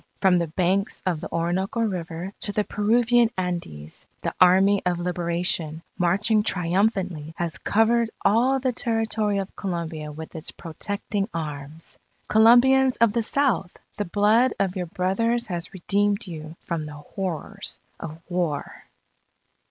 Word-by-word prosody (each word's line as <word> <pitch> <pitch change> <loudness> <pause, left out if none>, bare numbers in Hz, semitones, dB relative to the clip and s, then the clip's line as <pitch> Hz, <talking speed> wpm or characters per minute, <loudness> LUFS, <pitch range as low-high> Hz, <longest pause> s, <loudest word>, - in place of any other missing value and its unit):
From 190 -2 +4
the 170 -1 0
banks 185 +5 0
of 175 -4 0
the - - -7
Orinoco 180 +6 -1
River 180 -3 -3
to 205 - -3
the 210 +1 +1
Peruvian 235 +3 +3
Andes, 170 - -4 0.2
the - - -1
Army 190 +2 +6
of 180 -1 0
Liberation, 170 -2 -1
marching 200 +5 +2
triumphantly, 180 -4 0
has 170 -2 -2
covered 225 +2 +2 0.2
all 240 +7 +4
the 255 -1 0
territory 225 -3 0
of 195 0 -4
Colombia 165 -5 -4
with 160 +2 -9
its 160 0 -5
protecting 200 +5 -4
arms._... 150 0 -6 0.3
_Colombians 250 +4 +6
of 230 -2 +4
the 235 - +1
South! 235 - 0 0.2
the 205 - -1
blood 215 +7 +3
of 190 -1 0
your 180 -2 -3
brothers 230 +8 0
has 175 -4 -4
redeemed 200 +3 0
you 160 -3 -8
from 160 -3 -3
the 150 - -8
horrors 190 +5 -4 0.2
of 160 0 -7
War! 175 -5 -3
190 Hz, 135 wpm, -24 LUFS, 170-215 Hz, 0.3 s, Army